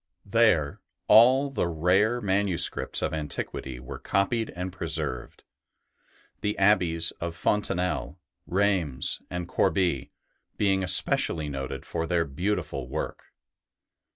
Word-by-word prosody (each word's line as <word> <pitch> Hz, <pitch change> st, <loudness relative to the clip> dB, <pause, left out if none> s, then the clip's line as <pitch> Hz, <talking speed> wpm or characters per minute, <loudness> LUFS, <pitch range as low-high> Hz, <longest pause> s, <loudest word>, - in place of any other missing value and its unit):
There 100 Hz, -9 st, +2 dB, 0.3 s
all 130 Hz, +6 st, +6 dB
the 110 Hz, -, 0 dB
rare 95 Hz, +9 st, +2 dB
manuscripts 95 Hz, -3 st, 0 dB
of -, -, -1 dB
antiquity 70 Hz, -4 st, -4 dB
were 60 Hz, -, -8 dB
copied 110 Hz, +4 st, 0 dB
and 90 Hz, +1 st, -4 dB
preserved; 75 Hz, -7 st, -4 dB, 1.0 s
the 105 Hz, 0 st, -2 dB
abbeys 90 Hz, -5 st, +3 dB
of 85 Hz, -1 st, -3 dB
Fontanelle, 90 Hz, -1 st, -1 dB, 0.3 s
Reims, 90 Hz, -9 st, 0 dB
and 90 Hz, -1 st, -4 dB
Corbie 85 Hz, -7 st, +1 dB, 0.5 s
being 95 Hz, -2 st, +2 dB
especially 80 Hz, -3 st, +2 dB
noted 70 Hz, -1 st, -5 dB
for 80 Hz, -, -3 dB
their 85 Hz, 0 st, +1 dB
beautiful 70 Hz, -4 st, -3 dB
work. -, -, -5 dB
90 Hz, 105 wpm, -27 LUFS, 80-100 Hz, 1.0 s, all